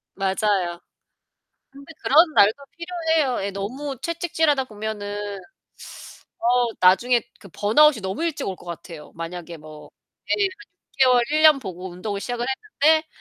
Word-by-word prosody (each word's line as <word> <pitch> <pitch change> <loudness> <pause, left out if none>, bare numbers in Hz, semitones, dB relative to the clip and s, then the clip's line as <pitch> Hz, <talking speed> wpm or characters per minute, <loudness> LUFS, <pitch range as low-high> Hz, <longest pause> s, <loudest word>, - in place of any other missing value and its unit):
맞아요. 195 -2 0 0.9
근데 280 +4 -13
그런 315 +3 +5
날도 215 +8 +4
필요해요. 325 - -1
예 200 - -2
너무 255 +8 -5
채찍질하다 320 -5 0
보면은 205 -2 -5 1.0
어 - - -19 0.4
나중에 235 +7 +4 0.2
그 195 - -14
번아웃이 225 - +3
너무 190 - -3
일찍 310 -4 -2
올 190 - -3
것 - - -17
같아요. 170 -2 -9
만약에 170 0 -7
뭐 155 0 -13 0.4
예 - - +5
한 400 -1 +2 0.5
6 - - +9
개월 250 -1 +5
1 310 0 +2
년 305 -3 +7
보고 190 -4 -7
운동을 200 +3 -5
시작을 240 +2 -3 0.4
했는데 315 +1 +4
220 Hz, 280 characters per minute, -23 LUFS, 190-300 Hz, 1.0 s, 6